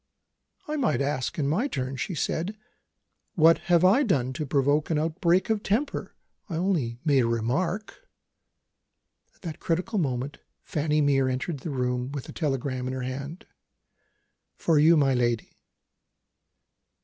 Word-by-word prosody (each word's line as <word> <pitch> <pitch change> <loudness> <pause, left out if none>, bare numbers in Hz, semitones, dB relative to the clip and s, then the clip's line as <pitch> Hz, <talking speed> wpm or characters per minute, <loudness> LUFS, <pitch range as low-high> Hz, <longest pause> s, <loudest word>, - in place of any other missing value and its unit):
"I 305 0 -2
might 255 -7 +1
ask, 140 -2 -1
in 145 -3 0
my 190 - +1
turn," 130 - -3
she 165 +8 -3
said, 175 +7 -2 0.8
"what 165 0 +6
have 175 0 +5
I 205 +9 +5
done 135 - +1
to 150 +2 -4
provoke 145 +2 +2
an 160 - +1
outbreak 170 +6 +1
of 215 -2 0
temper? 230 +9 -2 0.3
I 170 - -3
only 160 -10 0
made 145 -3 +4
a 120 - +2
remark." 175 - -2 1.3
At - - -28
that 160 -4 -6
critical 185 +6 -1
moment, 135 -2 -2 0.2
Fanny 150 0 0
Mere 135 -2 +3
entered 130 +4 -3
the 160 - -6
room 125 -1 -1
with 140 -3 -5
a - - -8
telegram 135 -4 -2
in 130 - -3
her 130 -1 -4
hand. 140 +6 -6 1.1
"For 160 -3 +2
you, 160 +2 +6
my 135 -2 +3
lady." 120 -2 -1
150 Hz, 150 wpm, -26 LUFS, 130-175 Hz, 1.3 s, what